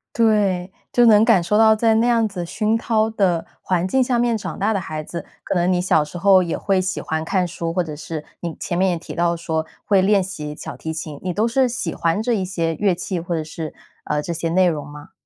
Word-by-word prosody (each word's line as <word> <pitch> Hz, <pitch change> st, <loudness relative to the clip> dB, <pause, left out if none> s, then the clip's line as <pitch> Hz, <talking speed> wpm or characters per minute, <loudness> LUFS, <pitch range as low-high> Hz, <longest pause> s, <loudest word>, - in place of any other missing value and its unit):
对， 200 Hz, -5 st, +2 dB, 0.2 s
就 245 Hz, -, +4 dB
能 220 Hz, -2 st, +7 dB
感 225 Hz, -6 st, +5 dB
受 190 Hz, +5 st, +1 dB
到 220 Hz, 0 st, +6 dB
在 220 Hz, 0 st, +2 dB
那 225 Hz, -, +3 dB
样 230 Hz, -2 st, +3 dB
子 180 Hz, -4 st, -5 dB
熏 215 Hz, +5 st, 0 dB
陶 225 Hz, -1 st, +1 dB
的 185 Hz, -6 st, +1 dB, 0.2 s
环 180 Hz, 0 st, 0 dB
境 260 Hz, +6 st, +2 dB
下 245 Hz, -1 st, 0 dB
面 235 Hz, -2 st, +2 dB
长 210 Hz, -, -6 dB
大 215 Hz, +3 st, +1 dB
的 195 Hz, -, -1 dB
孩 155 Hz, -2 st, -5 dB
子， 170 Hz, +2 st, -7 dB, 0.2 s
可 -, -, -2 dB
能 175 Hz, +1 st, +2 dB
你 180 Hz, -, +2 dB
小 170 Hz, -4 st, +3 dB
时 150 Hz, +4 st, -8 dB
候 190 Hz, 0 st, +5 dB
也 170 Hz, -, -2 dB
会 195 Hz, -2 st, +1 dB
喜 185 Hz, -1 st, -2 dB
欢 160 Hz, 0 st, -3 dB
看 180 Hz, +2 st, 0 dB
书， 165 Hz, -1 st, -4 dB
或 180 Hz, -, +1 dB
者 155 Hz, -3 st, -5 dB
是 155 Hz, 0 st, -6 dB, 0.2 s
你 170 Hz, -2 st, -4 dB
前 175 Hz, -, -3 dB
面 190 Hz, +1 st, +3 dB
也 175 Hz, -, -1 dB
提 165 Hz, -, -9 dB
到 170 Hz, 0 st, +1 dB
说 160 Hz, -1 st, -2 dB, 0.2 s
会 195 Hz, -2 st, +4 dB
练 200 Hz, +1 st, +4 dB
习 155 Hz, -6 st, -5 dB
小 -, -, -8 dB
提 160 Hz, 0 st, -5 dB
琴， 155 Hz, -2 st, -6 dB
你 185 Hz, -, -1 dB
都 215 Hz, +6 st, +1 dB
是 255 Hz, +2 st, +2 dB
喜 190 Hz, -8 st, -3 dB
欢 165 Hz, +5 st, 0 dB
这 240 Hz, +2 st, 0 dB
一 195 Hz, -4 st, 0 dB
些 165 Hz, -3 st, -2 dB
乐 200 Hz, -1 st, +2 dB
器 180 Hz, 0 st, -4 dB
或 175 Hz, +1 st, -4 dB
者 160 Hz, -, -1 dB
是， 155 Hz, 0 st, -6 dB, 0.3 s
呃， 150 Hz, 0 st, -1 dB
这 170 Hz, -, -4 dB
些 165 Hz, 0 st, -2 dB
内 185 Hz, +2 st, +4 dB
容 150 Hz, -4 st, -2 dB
吗？ 145 Hz, 0 st, -12 dB
180 Hz, 270 characters per minute, -21 LUFS, 165-215 Hz, 0.3 s, 能